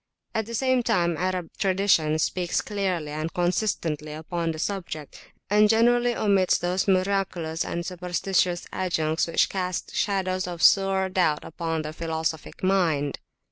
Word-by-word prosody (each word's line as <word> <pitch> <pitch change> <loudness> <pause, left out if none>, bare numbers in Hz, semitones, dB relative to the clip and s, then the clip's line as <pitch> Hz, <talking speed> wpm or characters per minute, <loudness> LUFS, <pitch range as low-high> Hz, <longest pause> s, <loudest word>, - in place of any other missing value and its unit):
At 220 -2 -1
the 230 - -4
same 260 +1 +2
time 175 -8 +1
Arab 180 -1 -2
tradition 185 -5 +2
speaks 175 +2 0
clearly 185 -7 -2
and 155 +2 -3
consistently 170 -4 -1
upon 165 +2 -3
the 160 - -3
subject, 165 -5 -5 0.2
and 210 +1 +4
generally 240 +2 +3
omits 195 -3 +3
those 180 +3 -1
miraculous 185 -4 0
and 170 0 -4
superstitious 180 0 -1
adjuncts 160 -3 0
which 165 - +2
cast 185 -2 -3
shadows 185 -2 0
of 175 -2 -5
sore 195 -1 +4
doubt 180 -5 +1
upon 165 -1 -3
the 155 0 -6
philosophic 160 0 -4
mind. 170 -7 +1
180 Hz, 140 wpm, -25 LUFS, 160-195 Hz, 0.2 s, and